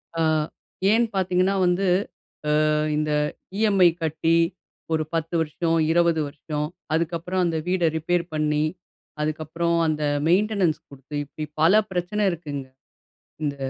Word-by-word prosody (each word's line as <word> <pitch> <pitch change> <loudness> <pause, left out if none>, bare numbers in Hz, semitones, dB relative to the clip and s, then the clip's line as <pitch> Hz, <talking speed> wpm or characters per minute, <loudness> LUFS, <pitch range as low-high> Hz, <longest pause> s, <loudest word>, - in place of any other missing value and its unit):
அ 165 - 0 0.7
ஏன்னு 230 +1 +3
பார்த்தீங்கன்னா, 185 +1 +2
வந்து 180 +2 +2 0.8
அ - - +2 0.3
இந்த 150 0 0 0.5
இஎம்ஐ 195 -5 +5
கட்டி 160 +1 +1 0.6
ஒரு 155 0 +1
10 165 +1 -2
வருஷம், 165 +2 0
20 170 -2 +3
வருஷம், 150 +1 -4 0.3
அதுக்கப்புறம் 170 +2 -1
அந்த 165 -1 0
வீட 185 0 0 0.2
ரிப்பேர் 175 +2 0
பண்ணி. 150 0 +1 0.6
அதுக்கப்புறம், 160 +2 -1
அந்த 155 -1 -1 0.2
மெயின்டெனன்ஸ் 190 -2 +2
குடுத்து, 140 +1 -10
இப்டி 150 +2 -6 0.2
பல 200 +7 +6
பிரச்சனை 190 +4 -1
இருக்குங்க. 145 -5 -5 0.8
இந்த 140 -1 -1
165 Hz, 120 wpm, -24 LUFS, 155-180 Hz, 0.8 s, பல